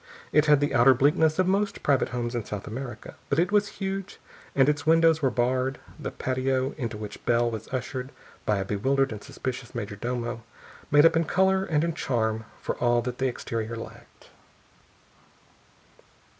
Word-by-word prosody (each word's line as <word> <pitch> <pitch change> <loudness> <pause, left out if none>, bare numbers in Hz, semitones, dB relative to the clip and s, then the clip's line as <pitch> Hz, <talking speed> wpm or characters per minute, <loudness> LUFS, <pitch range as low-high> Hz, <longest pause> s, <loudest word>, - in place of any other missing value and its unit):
It 150 0 +4
had 150 -1 +5
the 145 - 0
outer 130 +2 +6
bleakness 155 +4 +3
of 185 - +3
most 200 +2 0
private 140 -2 +2
homes 120 -1 -3
of 120 -3 -3
South 105 -2 -5
America, 120 0 -7 0.2
but 140 - +1
if 165 - +5
it 180 - -5
was 205 -1 +3
huge 195 0 -4 0.4
and 135 -1 +5
its 150 0 +1
windows 165 0 +4
were 135 - +3
barred, 130 +2 0 0.2
the - - -4
patio 130 +1 -1
into 115 -6 -4
which 105 -1 -8
Bell 120 0 +2
was 110 -1 -6
ushered 130 0 -4 0.3
by 105 - +1
a 95 - -2
bewildered 135 +7 +1
and 105 -1 -7
suspicious 130 -2 -6
major 105 -3 -4
domo 120 +1 -3 0.5
made 145 +2 +6
up 165 - +5
in 165 0 +2
color 190 +2 +2
and 155 -3 +1
in 170 0 0
charm 110 -7 -1
for - - -3
all 120 -1 +2
that 125 0 -5
the 135 - +2
exterior 115 -2 -4
lacked. 115 - -11
130 Hz, 180 wpm, -26 LUFS, 120-150 Hz, 0.5 s, outer